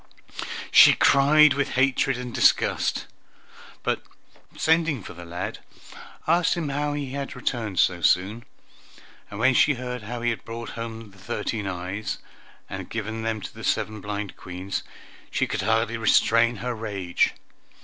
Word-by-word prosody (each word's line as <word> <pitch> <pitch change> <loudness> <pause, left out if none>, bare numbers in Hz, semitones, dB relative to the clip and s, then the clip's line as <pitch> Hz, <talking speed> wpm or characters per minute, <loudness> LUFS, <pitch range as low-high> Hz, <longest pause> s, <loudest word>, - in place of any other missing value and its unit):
She - - +9
cried 150 +2 +6
with 140 0 -1
hatred 135 0 +2
and 125 -1 -6
disgust, - - +2 0.8
but - - 0 0.6
sending 160 - +2
for - - -9
the 85 0 -10
lad, 85 +1 -5 0.7
asked 170 +3 +3
him 165 -4 -2
how 145 +1 -1
he 145 -3 -4
had 140 0 -5
returned 115 -6 -3
so 90 0 +3
soon, 100 +8 +2 0.9
and 100 - -8
when 130 +3 +4
she 150 +3 +4
heard 125 0 -5
how 120 +3 -6
he 120 0 +1
had 115 - -5
brought 115 0 -7
home 115 -2 -7
the 95 - -19
thirteen 110 0 -3
eyes, 95 +3 -4 0.5
and 95 -2 -7
given 110 0 -4
them 110 -1 -2
to - - -8
the - - -10
seven 110 -1 -1
blind 105 0 -5
Queens, 90 +2 -5 0.5
she - - 0
could - - -3
hardly 115 +2 +1
restrain 115 +1 +4
her 125 +1 -3
rage. 100 -6 -1
115 Hz, 150 wpm, -25 LUFS, 100-130 Hz, 0.9 s, She